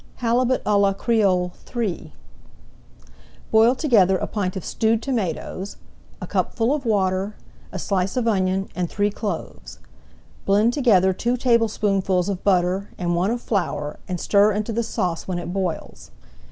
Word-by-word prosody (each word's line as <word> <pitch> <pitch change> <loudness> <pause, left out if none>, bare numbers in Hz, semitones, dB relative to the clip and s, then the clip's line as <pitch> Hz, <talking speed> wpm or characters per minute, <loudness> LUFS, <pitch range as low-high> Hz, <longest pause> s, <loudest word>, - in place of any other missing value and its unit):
HALIBUT 245 +2 +1
À 205 -1 +2
LA 200 -1 +3
CREOLE 195 -5 +1 0.2
III 215 -7 -2 1.4
Boil 225 +3 +5
together 210 - +3
a - - -2
pint 185 -4 -3
of 190 - -5
stewed 225 0 +1
tomatoes, 200 - -3 0.4
a - - -5
cupful 235 +3 0
of 280 -5 -3
water, 195 -1 0 0.4
a - - -5
slice 190 +3 -1
of 240 -2 0
onion, 190 -2 +1
and 180 -2 -2
three 205 0 0
cloves. 170 - -6 0.7
Blend 210 +4 +3
together 195 -9 +4
two 240 +6 -1
tablespoonfuls 205 -6 +1
of 190 -2 -4
butter 185 0 +1
and 175 -1 -1
one 180 +3 +1
of 240 +1 -2
flour, 155 -9 -2
and 180 -2 -3
stir 205 +3 +4
into 215 +2 -2
the 235 - 0
sauce 180 -7 -2
when 185 -2 -2
it 175 0 -5
boils. 185 -4 -4
200 Hz, 150 wpm, -22 LUFS, 185-225 Hz, 1.4 s, Boil